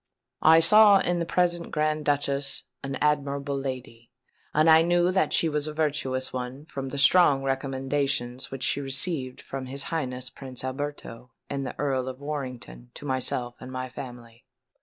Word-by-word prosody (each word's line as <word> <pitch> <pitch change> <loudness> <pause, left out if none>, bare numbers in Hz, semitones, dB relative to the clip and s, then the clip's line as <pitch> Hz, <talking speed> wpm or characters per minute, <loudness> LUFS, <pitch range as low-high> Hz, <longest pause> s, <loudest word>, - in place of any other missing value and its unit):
I 160 +1 +7
saw 210 +4 +7
in 175 -2 0
the 170 - -2
present 175 -1 0
Grand 155 -1 -1
Duchess 140 -1 0 0.2
an 135 0 -3
amiable 140 -1 0
lady; 125 -4 -6 0.4
and 155 +2 +3
I 160 0 +8
knew 175 +1 +3
that 190 +1 +1
she 165 - +3
was 150 -1 -1
a 155 - -6
virtuous 140 -4 -1
one 130 +3 -5
from 135 -3 -6
the 140 - -6
strong 140 -2 +5
recommendations 135 -1 -1
which 135 -1 -6
she 140 - +1
received 135 -1 0
from 135 -1 -6
his 135 +2 -1
Highness 130 -5 -3
Prince 130 -2 -7
Alberto 130 -3 -6 0.2
and 140 -1 -2
the - - -7
Earl 135 -3 -1
of 130 0 -6
Warrington 125 - -6
to - - -9
myself 130 -2 -1
and 130 - -9
my 130 0 -4
family. 120 -3 -10
140 Hz, 165 wpm, -26 LUFS, 130-150 Hz, 0.4 s, I